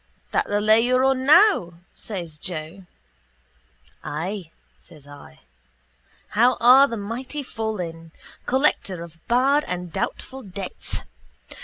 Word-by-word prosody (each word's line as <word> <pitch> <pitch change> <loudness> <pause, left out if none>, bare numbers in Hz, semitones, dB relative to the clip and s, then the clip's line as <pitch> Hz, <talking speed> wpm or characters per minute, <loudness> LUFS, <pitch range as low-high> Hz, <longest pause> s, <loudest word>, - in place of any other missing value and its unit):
—That - - 0
the 205 - 0
lay 215 +2 +4
you're 255 +2 +2
on 265 0 +1
now? 305 - +5 0.2
says 170 -7 -7
Joe. 175 +3 -7 1.2
—Ay, 175 +4 -5 0.3
says 155 -5 -16
I. 145 - -14 0.9
How 240 +4 +3
are 260 +4 +7
the 230 - -5
mighty 250 +8 -5
fallen! 180 -9 -5 0.4
Collector 245 - +1
of 170 -1 -13
bad 270 +5 +3
and 180 -2 -5
doubtful 265 0 -4
debts. 195 -3 -6
205 Hz, 115 wpm, -23 LUFS, 170-255 Hz, 1.2 s, are